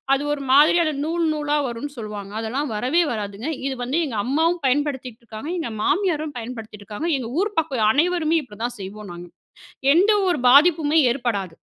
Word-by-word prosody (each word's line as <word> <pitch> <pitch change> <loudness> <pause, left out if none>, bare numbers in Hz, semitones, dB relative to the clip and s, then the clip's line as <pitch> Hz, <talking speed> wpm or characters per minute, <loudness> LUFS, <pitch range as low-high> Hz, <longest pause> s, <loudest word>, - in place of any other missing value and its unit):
அது 275 - -3
ஒரு 290 - -5
மாதிரியான 310 +3 +5
நூல் 335 +2 -1
நூலா 295 -1 -1
வரும்னு 255 +5 -6
சொல்லுவாங்க. 210 -3 -7
அதெல்லாம் 255 +5 -3
வரவே 255 +11 +1
வராதுங்க, 210 +4 -4 0.2
இது 270 - -3
வந்து, 270 +7 -1
எங்க 235 -6 -5
அம்மாவும் 325 +7 +1
பயன்படுத்திகிட்டுருக்காங்க, 255 -2 -3
எங்க 320 - -4
மாமியாரும் 315 - 0
பயன்படுத்திகிட்டுருக்காங்க, 225 +3 -6
எங்க 235 -3 -5
ஊர் 415 +1 -2
பக்கம் 265 -9 +1
அனைவருமே 330 +3 +2
இப்படிதான் 235 0 -6
செய்வோம் 200 0 -8
நாங்க. 175 0 -9 0.7
எந்த 380 +6 +4 0.2
ஒரு 350 - 0
பாதிப்புமே 310 +2 +5
ஏற்படாது. 205 -10 -3
270 Hz, 150 wpm, -22 LUFS, 220-315 Hz, 0.7 s, மாதிரியான